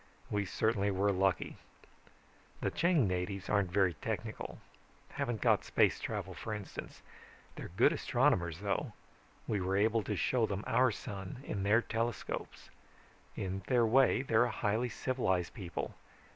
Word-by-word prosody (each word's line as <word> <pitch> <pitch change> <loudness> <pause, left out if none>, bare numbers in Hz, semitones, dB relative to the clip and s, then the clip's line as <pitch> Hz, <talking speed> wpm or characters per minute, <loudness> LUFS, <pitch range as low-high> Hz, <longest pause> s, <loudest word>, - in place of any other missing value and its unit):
We 105 -1 0
certainly 105 0 +1
were 100 +1 +2
lucky. 95 0 0 1.0
"The - - -1
Chang 165 - +3
natives 95 +1 -3
aren't 100 -4 +2
very 95 -2 +3
technical 75 - -5 0.5
haven't 120 -4 -3
got - - +4
space - - +3
travel - - -4
for 110 - -4
instance. 105 -2 -8 0.5
They're - - -7
good - - +5
astronomers, 85 -1 +1
though. 100 -1 -1 0.5
We 105 -3 0
were 95 +1 0
able 110 +2 +3
to 105 - -1
show 115 +3 +2
them 100 0 -3
our 130 +1 +4
sun, 100 +2 -6
in 100 -7 -3
their 105 +4 +4
telescopes. 115 -1 -3 0.6
In 95 0 -3
their 120 -2 +4
way, 130 +2 +4
they're 120 -2 +4
a - - -1
highly 110 +3 0
civilized 95 -7 -1
people. 95 -7 -5
105 Hz, 145 wpm, -33 LUFS, 95-115 Hz, 1.0 s, good